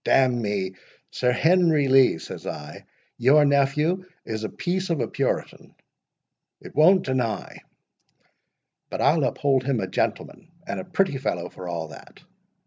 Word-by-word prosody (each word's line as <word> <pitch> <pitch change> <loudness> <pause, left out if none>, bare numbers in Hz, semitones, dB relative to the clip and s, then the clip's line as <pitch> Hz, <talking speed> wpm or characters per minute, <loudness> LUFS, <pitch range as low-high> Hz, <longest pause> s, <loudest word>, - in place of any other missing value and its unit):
—D—n 125 -3 +3
me, 100 -3 -2 0.4
Sir 125 -1 +1
Henry 160 0 +3
Lee, 130 -8 +5
says - - -9
I, 75 0 -8 0.3
your 140 +5 +5
nephew 145 +6 +1 0.2
is 110 -1 -4
a 110 - -3
piece 185 +1 -3
of 165 -3 0
a - - -1
Puritan—it - - -7
won't 180 +5 +5
deny—but 125 -6 -2 1.5
I'll - - +3
uphold 135 -2 +1
him 135 -4 0
a 95 - -1
gentleman 95 - -3 0.2
and 100 - -4
a - - -5
pretty 185 -9 0
fellow, 90 -10 -3
for 90 - -10
all 85 -2 -4
that. - - -14
135 Hz, 135 wpm, -24 LUFS, 105-155 Hz, 1.5 s, Lee